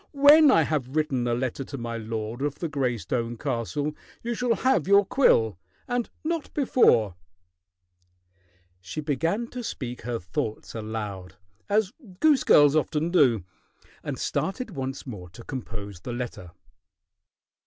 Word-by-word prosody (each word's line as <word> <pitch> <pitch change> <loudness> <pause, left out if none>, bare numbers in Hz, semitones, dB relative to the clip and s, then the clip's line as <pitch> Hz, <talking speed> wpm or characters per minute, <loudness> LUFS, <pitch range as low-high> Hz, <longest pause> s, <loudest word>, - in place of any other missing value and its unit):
"When 290 +2 +7
I - - +5
have 140 -3 -2
written 135 -6 0
a 120 - +1
letter 130 +2 -2
to 140 +1 -7
my 120 -1 -4
lord 110 +1 -4
of 145 0 -1
the 170 - -3
gray 135 -5 -1
stone 115 +4 -3
castle, 145 +4 -2 0.3
you 235 +1 -1
shall 240 0 +1
have 260 - +2
your 200 0 +6
quill 110 - +3 0.3
and 245 -1 -1
not 330 -1 -2
before." 120 - +4 1.7
She 95 +11 -7
began 165 - 0
to 250 -1 -6
speak 125 - -5
her 120 0 -3
thoughts 100 +3 -4
aloud, 105 -4 -5 0.3
as 205 -1 +2 0.3
goose 300 -4 +4
girls 145 0 +6
often 155 +2 0
do, 130 - +4 0.6
and - - -4
started 225 +4 -2
once 135 -4 -5
more 100 -9 -8
to 115 +7 -12
compose 105 - -7
the 120 +7 -6
letter. 120 -7 -5
135 Hz, 145 wpm, -26 LUFS, 115-190 Hz, 1.7 s, When